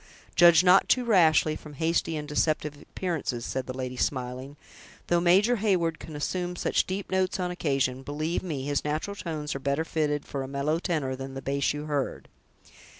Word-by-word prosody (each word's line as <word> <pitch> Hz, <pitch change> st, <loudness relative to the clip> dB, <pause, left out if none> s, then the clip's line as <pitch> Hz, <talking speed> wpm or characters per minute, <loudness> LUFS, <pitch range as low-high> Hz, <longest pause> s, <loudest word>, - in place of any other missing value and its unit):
"Judge 170 Hz, 0 st, +7 dB
not 185 Hz, +1 st, +5 dB
too 250 Hz, -1 st, +3 dB
rashly 160 Hz, -7 st, +4 dB
from 150 Hz, -1 st, -10 dB
hasty 165 Hz, +1 st, 0 dB
and 150 Hz, 0 st, -5 dB
deceptive 150 Hz, 0 st, 0 dB
appearances," 155 Hz, -10 st, -3 dB
said 130 Hz, -1 st, -3 dB
the 130 Hz, 0 st, -5 dB
lady, 130 Hz, -1 st, -4 dB
smiling; 130 Hz, +2 st, -3 dB, 0.5 s
"though 175 Hz, 0 st, +3 dB
Major 195 Hz, +8 st, +4 dB
Heyward 180 Hz, -6 st, +1 dB
can 155 Hz, -, -9 dB
assume 180 Hz, +4 st, -2 dB
such -, -, 0 dB
deep 190 Hz, +1 st, -4 dB
notes 190 Hz, +1 st, 0 dB
on 180 Hz, -1 st, -1 dB
occasion, 135 Hz, -7 st, 0 dB
believe 155 Hz, +5 st, -2 dB
me, 150 Hz, -7 st, -4 dB
his 145 Hz, 0 st, -1 dB
natural 155 Hz, +7 st, -2 dB
tones 155 Hz, -6 st, -4 dB
are 135 Hz, -, -4 dB
better 140 Hz, +4 st, -1 dB
fitted 150 Hz, -3 st, -1 dB
for 140 Hz, -, -4 dB
a 135 Hz, -, -4 dB
mellow 140 Hz, +4 st, -1 dB
tenor 150 Hz, -8 st, -1 dB
than 135 Hz, 0 st, -7 dB
the 135 Hz, -, -5 dB
bass 140 Hz, +1 st, 0 dB
you 150 Hz, +1 st, -5 dB
heard." 145 Hz, -3 st, -3 dB
155 Hz, 185 wpm, -27 LUFS, 140-175 Hz, 0.5 s, Judge